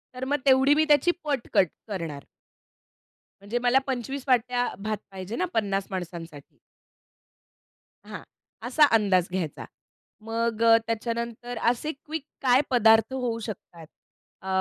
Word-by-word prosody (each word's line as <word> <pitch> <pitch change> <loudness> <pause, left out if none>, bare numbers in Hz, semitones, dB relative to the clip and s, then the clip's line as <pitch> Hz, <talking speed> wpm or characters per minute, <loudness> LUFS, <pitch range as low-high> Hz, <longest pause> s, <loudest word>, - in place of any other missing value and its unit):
तर 255 +1 -4
मग 285 +2 0
तेवढी 265 +1 +5
मी 310 - +4
त्याची 295 +4 +5
पट 280 -5 -2
कट 185 - +5 0.2
करणार. 165 -9 -5 1.2
म्हणजे 205 +4 -3
मला 250 +2 +4
25 265 +1 -3
वाट्या 245 -1 +2 0.2
भात 215 0 -2
पाहिजे 190 +3 -6
ना 365 - 0
50 200 -3 -1
माणसांसाठी. 170 -5 -7 1.5
हां. - - -7 0.4
असा 295 +4 +5
अंदाज 190 -5 +3
घ्यायचा. 180 -5 -4 0.6
मग 225 0 -2
अ, 230 0 +7
त्याच्यानंतर 235 +1 -4
असे 250 +6 -2
क्विक 310 +1 -7 0.2
काय 255 -1 +4
पदार्थ 225 -1 +4
होऊ 245 -3 -2
शकतात? 170 -6 -9 0.5
अ, 190 - -10
230 Hz, 125 wpm, -26 LUFS, 200-260 Hz, 1.5 s, अ